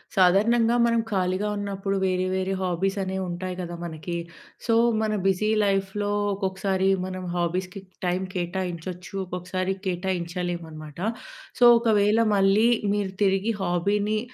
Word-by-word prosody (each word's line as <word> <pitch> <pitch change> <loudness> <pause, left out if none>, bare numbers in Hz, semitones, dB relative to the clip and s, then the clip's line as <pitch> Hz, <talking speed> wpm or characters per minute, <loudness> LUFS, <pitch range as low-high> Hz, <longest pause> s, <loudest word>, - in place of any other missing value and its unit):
సాధారణంగా, 225 +6 +4
మనం 230 0 +2
ఖాళీగా 185 +1 0
ఉన్నప్పుడు 195 -1 -2
వేరే 185 -1 +1
వేరే 190 0 -1
హాబీస్ 185 +2 -1
అనేవి 190 0 -3
ఉంటాయి 180 +1 -4
కదా 175 -1 -5
మనకి. 170 +1 -5 0.5
సో, 230 - +2 0.3
మన 215 -1 0
బిజీ 195 +2 +2 0.2
లైఫ్‌లో, 195 +1 0 0.2
ఒక్కొక్కసారి 190 0 0 0.2
మనం 185 0 -5
హాబీస్‌కి 180 +3 -2 0.2
టైమ్ 180 +1 0
కేటాయించొచ్చు. 180 0 -4
ఒక్కొక్కసారి 185 +1 -3
కేటాయించలేము 175 -1 -2
అనమాట. 155 0 -10 0.6
సో, - - +4 0.2
ఒకవేళ 215 -1 +3 0.2
మళ్ళీ 195 +3 +4 0.3
మీరు 205 -2 -1
తిరిగి 195 +3 +2
హాబీని 205 +4 +1
190 Hz, 120 wpm, -25 LUFS, 180-200 Hz, 0.6 s, సాధారణంగా